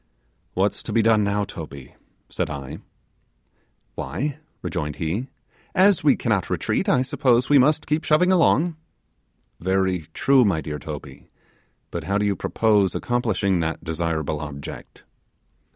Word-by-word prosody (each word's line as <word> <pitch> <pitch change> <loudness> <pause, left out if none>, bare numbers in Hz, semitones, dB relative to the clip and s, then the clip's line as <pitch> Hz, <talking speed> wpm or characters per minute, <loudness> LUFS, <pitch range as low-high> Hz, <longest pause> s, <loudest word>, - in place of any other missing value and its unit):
'What's - - 0
to - - -6
be 115 - +3
done 110 -1 +4
now, 100 0 0
Toby?' 75 -8 -9 0.3
said - - -3
I. 70 +1 -6 1.1
'Why,' 145 +1 -4 0.2
rejoined 75 -1 -3
he, 90 +11 -2 0.5
'as 190 -3 +4
we 145 - +5
cannot 105 -7 0
retreat, - - 0
I 125 - +3
suppose 130 -3 +2
we 145 - +7
must 150 +4 +3
keep 150 +2 0
shoving 180 +4 +3
along.' 170 -2 +3 0.8
'Very 95 -2 0
true, 135 -2 +4
my 95 -7 +2
dear 75 -1 -5
Toby; - - -9 0.6
but 85 -2 -4
how 100 +3 0
do 105 - 0
you 100 -1 +1
purpose 105 -4 +2
accomplishing 105 -6 0
that 80 0 -2
desirable 80 -2 -2
object? 70 -2 -8
100 Hz, 135 wpm, -23 LUFS, 80-130 Hz, 1.1 s, we